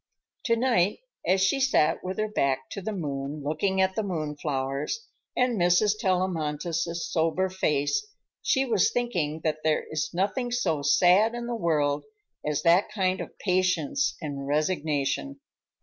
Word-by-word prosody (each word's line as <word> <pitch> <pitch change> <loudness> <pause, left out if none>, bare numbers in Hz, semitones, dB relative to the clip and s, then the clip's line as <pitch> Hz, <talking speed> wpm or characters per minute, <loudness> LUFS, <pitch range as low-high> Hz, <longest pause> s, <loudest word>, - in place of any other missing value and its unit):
To 230 - +3
night, 225 - +2 0.3
as 190 +1 +3
she 190 +8 +3
sat 265 - +2
with 185 +1 -4
her 215 - 0
back 135 -10 -1
to 200 - -5
the 220 - -3
moon, 145 -5 -4
looking 175 +7 0
at 190 0 +2
the 220 - -1
moon 160 -7 -3
flowers 140 - -3 0.3
and 250 -4 +2
Mrs. 180 +4 +4
Tellamantez's 170 -3 -1
somber 165 +3 +1
face, 185 - 0 0.3
she 265 -1 +2
was 220 -7 +3
thinking 170 -11 -1
that 155 -1 0
there 155 -1 +2
is 155 -1 -1
nothing 200 +8 -1
so 240 -11 0
sad 185 +10 +4
in 240 0 -4
the 240 - -3
world 150 -8 +1 0.4
as 150 -1 -1
that 175 +3 +4
kind 185 -2 0
of - - -9
patience 185 +10 +1
and 140 -4 -5
resignation. 155 - -1
180 Hz, 150 wpm, -27 LUFS, 150-210 Hz, 0.4 s, Mrs